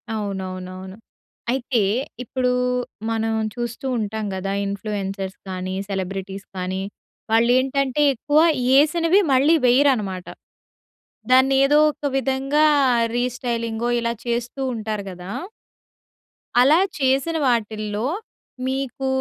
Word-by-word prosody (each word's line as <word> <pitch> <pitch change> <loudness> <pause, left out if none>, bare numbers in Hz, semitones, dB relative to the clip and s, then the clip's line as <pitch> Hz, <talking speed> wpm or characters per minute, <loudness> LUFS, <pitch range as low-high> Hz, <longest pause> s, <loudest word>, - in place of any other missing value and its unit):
అవునవునవును. 190 -2 -5 0.6
అయితే, 250 -2 0 0.4
ఇప్పుడు 250 +1 -1 0.6
మనం 225 0 0 0.2
చూస్తూ 240 +1 -5
ఉంటాం 220 0 -3
కదా! 190 +1 -3
ఇన్‌ఫ్లూయెన్సర్స్ 195 -1 -4
కానీ, 185 0 -4
సెలబ్రిటీస్ 195 0 -4
కానీ, 185 +1 -2 0.5
వాళ్ళు 230 +2 +4
ఏంటంటే 270 +1 0
ఎక్కువ 290 +5 +1 0.4
ఏసినవి 330 +5 +4
మళ్ళీ 280 +5 +5
వెయ్యరన్నమాట. 240 -8 +2 1.1
దాన్ని 260 +1 +5
ఏదో 295 +2 +4
ఒక 295 - -9
విధంగా 270 +3 +1 0.5
రీస్టైలింగో 240 -2 -2
ఇలా 235 0 -1
చేస్తూ 240 +3 -2
ఉంటారు 215 -2 -3
కదా! 180 +1 -9 1.3
అలా 285 +5 +6 0.2
చేసిన 275 +5 +1
వాటిల్లో 215 -2 -1 0.6
మీకు, 265 0 -2
235 Hz, 95 wpm, -22 LUFS, 195-265 Hz, 1.3 s, అలా